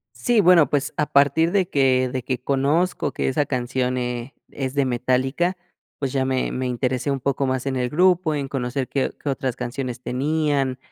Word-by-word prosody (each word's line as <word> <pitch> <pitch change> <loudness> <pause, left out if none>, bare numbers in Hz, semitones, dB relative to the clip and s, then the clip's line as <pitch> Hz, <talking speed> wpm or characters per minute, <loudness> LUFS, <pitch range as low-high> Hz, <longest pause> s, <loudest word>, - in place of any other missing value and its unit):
Sí, 220 - +2
bueno, 175 -7 +6
pues, 145 -1 -1
a 150 - +1
partir 145 +4 +3
de 190 -3 +2
que 130 -3 +2
de 130 - -2
que 130 +1 -2
conozco 140 +4 0
que - - -1
esa 145 +2 0
canción, 125 0 -1
eh, 125 +1 -4 0.2
es 135 -1 -4
de 140 - +2
Metallica, 130 +8 0 0.4
pues, 135 -3 -2
ya 135 -1 +1
me 130 -1 0
me 130 0 -2
interesé 125 +2 -1
un 135 -1 -1
poco 135 +1 0
más 130 0 -2
en 135 -1 -1
el 125 -1 0
grupo, 175 +2 +3
en 140 -2 -3
conocer 130 0 -3
qué 135 - 0
o - - -10
qué - - -5
otras 130 -2 -2
canciones 125 0 -4
tenían, 140 -1 0
135 Hz, 200 wpm, -22 LUFS, 130-145 Hz, 0.4 s, bueno